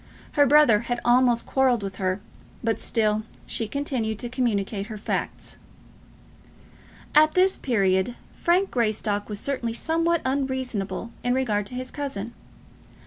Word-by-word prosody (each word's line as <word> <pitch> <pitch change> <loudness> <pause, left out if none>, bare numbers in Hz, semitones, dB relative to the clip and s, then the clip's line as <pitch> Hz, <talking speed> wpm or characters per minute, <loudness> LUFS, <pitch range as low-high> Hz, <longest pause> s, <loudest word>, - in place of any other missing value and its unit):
Her 285 -1 +4
brother 285 -6 +6
had 240 +2 -3
almost 240 -1 +4
quarrelled 255 -5 +2
with 195 -1 -5
her, 185 +1 -1 0.4
but 225 -1 0
still 215 -2 +1 0.2
she 225 - -2
continued 245 -4 -2
to 240 - -5
communicate 210 -5 -1
her 215 -1 -6
facts. 205 - -4 1.5
At 310 +1 +6
this 375 +1 +5
period 195 -2 +1 0.2
Frank 365 +3 +1
Greystock 215 -3 -1
was 205 -1 -3
certainly 240 -4 -2
somewhat 330 +5 0
unreasonable 260 -6 -2
in 245 0 +1
regard 210 -6 0
to 250 - -6
his 255 0 -5
cousin. 240 -6 -5
240 Hz, 135 wpm, -25 LUFS, 210-265 Hz, 1.5 s, brother